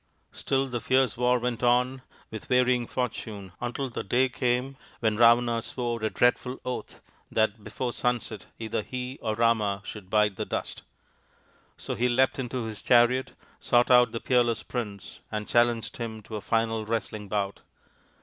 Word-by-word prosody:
Still 135 Hz, 0 st, 0 dB
the 120 Hz, -2 st, -4 dB
fierce 130 Hz, -3 st, +2 dB
war 125 Hz, +1 st, +3 dB
went 120 Hz, -1 st, -2 dB
on, 125 Hz, +2 st, +2 dB, 0.3 s
with 110 Hz, -1 st, -7 dB
varying 125 Hz, -1 st, +3 dB
fortune, 110 Hz, -6 st, -4 dB
until 125 Hz, +3 st, -2 dB
the 120 Hz, -, -5 dB
day 130 Hz, +6 st, +2 dB
came 125 Hz, +2 st, -1 dB, 0.2 s
when 110 Hz, -2 st, +1 dB
Ravana 120 Hz, +1 st, +5 dB
swore 120 Hz, -1 st, -3 dB
a 110 Hz, -, 0 dB
dreadful 125 Hz, +2 st, +1 dB
oath 125 Hz, -, -5 dB, 0.3 s
that 110 Hz, -1 st, 0 dB
before 125 Hz, +2 st, -4 dB
sunset 120 Hz, -4 st, -2 dB
either 110 Hz, -1 st, -2 dB
he 125 Hz, +4 st, -6 dB
or 110 Hz, -2 st, -1 dB
Rama 105 Hz, -3 st, +1 dB
should 100 Hz, -4 st, -8 dB
bite 105 Hz, -2 st, +2 dB
the -, -, -1 dB
dust. -, -, -4 dB, 1.0 s
So -, -, -5 dB
he 125 Hz, +1 st, +1 dB
leapt 130 Hz, +2 st, +2 dB
into 125 Hz, -1 st, -3 dB
his 110 Hz, -2 st, -5 dB
chariot, 125 Hz, +1 st, +3 dB, 0.3 s
sought 120 Hz, +1 st, +3 dB
out 125 Hz, 0 st, +6 dB
the 115 Hz, -, -3 dB
peerless 120 Hz, -2 st, +1 dB
prince, 105 Hz, -6 st, -6 dB
and 105 Hz, -1 st, -3 dB
challenged 120 Hz, -1 st, +1 dB
him 110 Hz, -3 st, -5 dB
to 110 Hz, -, -8 dB
a 105 Hz, -, -4 dB
final 115 Hz, 0 st, 0 dB
wrestling 110 Hz, -1 st, -3 dB
bout. 100 Hz, -1 st, -2 dB
120 Hz, 160 wpm, -27 LUFS, 110-125 Hz, 1.0 s, out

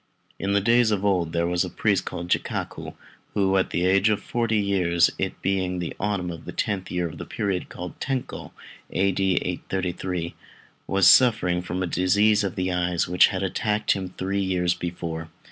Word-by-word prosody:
In 100 Hz, +1 st, -1 dB
the 100 Hz, -, +3 dB
days 115 Hz, +2 st, +4 dB
of 105 Hz, -2 st, 0 dB
old 90 Hz, -5 st, +1 dB
there 85 Hz, 0 st, 0 dB
was 90 Hz, 0 st, +1 dB
a -, -, -4 dB
priest -, -, 0 dB
called 85 Hz, -, -5 dB
Jikaku, -, -, -2 dB, 0.4 s
who 95 Hz, -1 st, +2 dB
at 95 Hz, -, +2 dB
the 90 Hz, -, 0 dB
age 95 Hz, +3 st, +4 dB
of 105 Hz, -, +1 dB
forty 115 Hz, -2 st, -1 dB
years, 95 Hz, -4 st, +2 dB
it -, -, -2 dB
being 95 Hz, -2 st, 0 dB
the 85 Hz, -2 st, -4 dB
autumn 95 Hz, -3 st, -1 dB
of 85 Hz, -, -9 dB
the -, -, -6 dB
tenth 95 Hz, -3 st, -2 dB
year 90 Hz, -1 st, -1 dB
of 80 Hz, -, -10 dB
the -, -, -4 dB
period 95 Hz, -4 st, -2 dB
called 90 Hz, -1 st, -8 dB
Tenchô 135 Hz, -2 st, -4 dB, 0.4 s
(A.D. 95 Hz, 0 st, +1 dB, 0.2 s
833), 90 Hz, -1 st, -3 dB, 0.5 s
was 95 Hz, -1 st, +4 dB
suffering 95 Hz, -8 st, +5 dB
from 90 Hz, +1 st, -3 dB
disease 105 Hz, +5 st, +3 dB
of 95 Hz, -, -3 dB
the 90 Hz, 0 st, -1 dB
eyes, 90 Hz, -1 st, 0 dB
which 90 Hz, +1 st, +5 dB
had 95 Hz, 0 st, -3 dB
attacked 105 Hz, +3 st, 0 dB
him 95 Hz, -2 st, -1 dB
three 100 Hz, +2 st, -1 dB
years 90 Hz, -2 st, +1 dB
before. 85 Hz, -2 st, -5 dB
95 Hz, 180 wpm, -24 LUFS, 90-100 Hz, 0.5 s, suffering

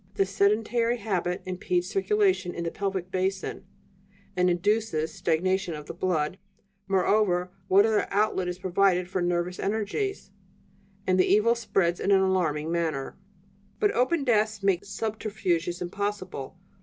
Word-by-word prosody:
The 195 Hz, -, +2 dB
sedentary 220 Hz, +4 st, +1 dB
habit 185 Hz, -5 st, -2 dB
impedes 180 Hz, -1 st, -1 dB
circulation 195 Hz, -2 st, +1 dB
in 170 Hz, -, -3 dB
the 165 Hz, -, -2 dB
pelvic 190 Hz, -2 st, -3 dB
basin, 190 Hz, +1 st, -2 dB, 0.7 s
and 180 Hz, 0 st, +3 dB
induces 180 Hz, -3 st, 0 dB
stagnation 185 Hz, +1 st, 0 dB
of 150 Hz, -1 st, -8 dB
the -, -, -7 dB
blood; 175 Hz, 0 st, -1 dB, 0.5 s
moreover, 190 Hz, -2 st, +2 dB, 0.2 s
what 195 Hz, +2 st, +6 dB
other 220 Hz, -2 st, +1 dB
outlet 200 Hz, -3 st, +1 dB
is 180 Hz, 0 st, -3 dB
provided 185 Hz, 0 st, +2 dB
for 185 Hz, 0 st, -2 dB
the 175 Hz, -, +1 dB
nervous 175 Hz, +1 st, -1 dB
energies? 220 Hz, -, -2 dB, 0.7 s
And 185 Hz, 0 st, +2 dB
the 185 Hz, -, +3 dB
evil 215 Hz, +3 st, +5 dB
spreads 195 Hz, -7 st, 0 dB
in -, -, -1 dB
an 195 Hz, -1 st, +5 dB
alarming 165 Hz, -5 st, 0 dB
manner. 160 Hz, -5 st, -2 dB, 0.6 s
"But 415 Hz, -, +3 dB
open 285 Hz, +1 st, +1 dB
desks 215 Hz, -4 st, +1 dB
make 195 Hz, -3 st, +1 dB
subterfuges 200 Hz, -5 st, -2 dB
impossible. 185 Hz, -5 st, -4 dB
190 Hz, 140 wpm, -27 LUFS, 175-210 Hz, 0.7 s, what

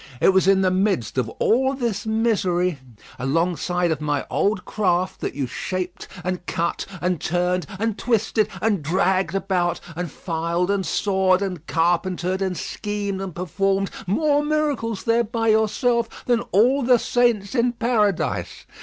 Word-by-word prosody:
It -, -, +5 dB
was 190 Hz, 0 st, +3 dB
in 195 Hz, 0 st, +5 dB
the 185 Hz, -1 st, +3 dB
midst 185 Hz, -, 0 dB
of 120 Hz, -3 st, -1 dB
all 265 Hz, +4 st, +2 dB
this 235 Hz, -4 st, -2 dB
misery, 185 Hz, -7 st, +1 dB, 0.4 s
alongside 170 Hz, +5 st, 0 dB
of 155 Hz, -2 st, -2 dB
my 145 Hz, -2 st, -1 dB
old 200 Hz, -2 st, 0 dB
craft, 185 Hz, -3 st, 0 dB
that -, -, -3 dB
you 140 Hz, -1 st, -1 dB
shaped, 180 Hz, +7 st, -4 dB, 0.2 s
and 180 Hz, 0 st, -3 dB
cut, 170 Hz, +1 st, -2 dB
and 180 Hz, -3 st, 0 dB
turned, 180 Hz, -1 st, 0 dB
and 225 Hz, +1 st, -1 dB
twisted, 220 Hz, -2 st, +1 dB, 0.2 s
and 210 Hz, -6 st, +2 dB
dragged 190 Hz, +4 st, +1 dB
about, 185 Hz, -3 st, 0 dB, 0.2 s
and 175 Hz, 0 st, -3 dB
filed, 170 Hz, +2 st, -1 dB
and 195 Hz, -2 st, -1 dB
sawed, 190 Hz, -1 st, +2 dB
and 180 Hz, -5 st, -5 dB
carpentered, 175 Hz, +2 st, 0 dB
and 190 Hz, -2 st, -1 dB
schemed, 205 Hz, -2 st, -3 dB
and 190 Hz, -4 st, -6 dB
performed 195 Hz, +2 st, 0 dB, 0.2 s
more 290 Hz, -, +2 dB
miracles 295 Hz, -8 st, -1 dB
there 230 Hz, 0 st, +3 dB
by 225 Hz, 0 st, -1 dB
yourself 230 Hz, +2 st, +1 dB
than 240 Hz, -1 st, +2 dB
all 245 Hz, +9 st, +4 dB
the 250 Hz, -1 st, +5 dB
saints 235 Hz, -5 st, +1 dB
in 240 Hz, -1 st, +2 dB
paradise. 225 Hz, -5 st, 0 dB
195 Hz, 150 wpm, -23 LUFS, 180-225 Hz, 0.4 s, It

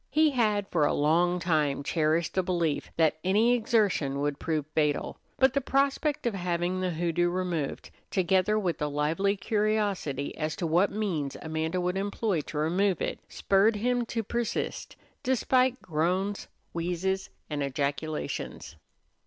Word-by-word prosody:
He 310 Hz, +1 st, +4 dB
had 215 Hz, -6 st, +1 dB
for 160 Hz, -4 st, +2 dB
a 145 Hz, -, +2 dB
long 170 Hz, +4 st, +3 dB
time 150 Hz, -5 st, +1 dB
cherished 155 Hz, +3 st, +1 dB
the 190 Hz, -, +2 dB
belief 170 Hz, -5 st, -1 dB
that 160 Hz, -1 st, +3 dB
any 210 Hz, +6 st, +4 dB
exertion 210 Hz, -, +1 dB
would 145 Hz, 0 st, -1 dB
prove 155 Hz, -3 st, -1 dB
fatal; 150 Hz, -2 st, 0 dB, 0.2 s
but 265 Hz, -1 st, +4 dB
the 280 Hz, -, +1 dB
prospect 275 Hz, +2 st, +1 dB
of 235 Hz, -, +1 dB
having 175 Hz, 0 st, -1 dB
the 185 Hz, -, 0 dB
hoodoo 175 Hz, +1 st, 0 dB
removed, 175 Hz, -5 st, -3 dB, 0.2 s
together 190 Hz, +2 st, +2 dB
with 180 Hz, -6 st, -1 dB
a 150 Hz, -, +1 dB
lively 155 Hz, +8 st, +1 dB
curiosity 205 Hz, -, -1 dB
as 155 Hz, 0 st, -2 dB
to 175 Hz, -, -3 dB
what 175 Hz, +5 st, +3 dB
means 180 Hz, -10 st, -2 dB
Amanda 160 Hz, +2 st, -2 dB
would 180 Hz, +1 st, -1 dB
employ 200 Hz, -2 st, -1 dB
to 150 Hz, -, -6 dB
remove 175 Hz, +4 st, +1 dB
it, -, -, -2 dB
spurred 200 Hz, +3 st, +3 dB
him 245 Hz, +3 st, +1 dB
to 225 Hz, 0 st, -2 dB
persist 235 Hz, +2 st, -3 dB, 0.3 s
despite 255 Hz, 0 st, +2 dB
groans, 180 Hz, +5 st, -1 dB, 0.3 s
wheezes, 180 Hz, +3 st, -1 dB, 0.2 s
and 150 Hz, -2 st, -3 dB
ejaculations. 140 Hz, +2 st, -3 dB
180 Hz, 145 wpm, -28 LUFS, 155-210 Hz, 0.3 s, He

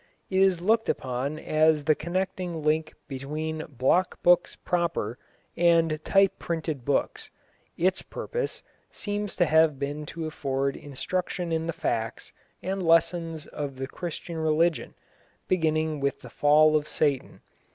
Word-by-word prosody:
It 190 Hz, -, +2 dB
is 190 Hz, -3 st, +4 dB
looked 225 Hz, +4 st, +2 dB
upon 130 Hz, +4 st, -2 dB
as 155 Hz, -1 st, +2 dB
the 155 Hz, -, +4 dB
connecting 175 Hz, 0 st, -3 dB
link 155 Hz, +1 st, +1 dB
between 155 Hz, +4 st, -4 dB
block 140 Hz, +8 st, +1 dB
books 175 Hz, 0 st, +4 dB
proper 170 Hz, -10 st, -1 dB, 0.4 s
and 165 Hz, -2 st, +3 dB
type 195 Hz, 0 st, +3 dB
printed 160 Hz, -5 st, -3 dB
books. 140 Hz, +2 st, -1 dB, 0.5 s
Its 185 Hz, +2 st, +1 dB
purpose 485 Hz, 0 st, -4 dB, 0.3 s
seems 205 Hz, -1 st, -3 dB
to 175 Hz, -, +3 dB
have 160 Hz, -2 st, +4 dB
been 145 Hz, +2 st, -4 dB
to 165 Hz, -1 st, -5 dB
afford 140 Hz, -3 st, -1 dB
instruction 175 Hz, +5 st, -3 dB
in 160 Hz, 0 st, -1 dB
the -, -, 0 dB
facts 115 Hz, -7 st, -3 dB, 0.3 s
and 190 Hz, +1 st, -2 dB
lessons 165 Hz, -1 st, +2 dB
of 145 Hz, -2 st, -5 dB
the 135 Hz, +1 st, -4 dB
Christian 170 Hz, +3 st, -6 dB
religion, 160 Hz, +1 st, +1 dB, 0.5 s
beginning 155 Hz, -3 st, +1 dB
with 140 Hz, -1 st, -1 dB
the -, -, -11 dB
fall 155 Hz, +1 st, +5 dB
of 150 Hz, 0 st, +1 dB
Satan. 145 Hz, -4 st, -1 dB
160 Hz, 135 wpm, -27 LUFS, 145-175 Hz, 0.5 s, fall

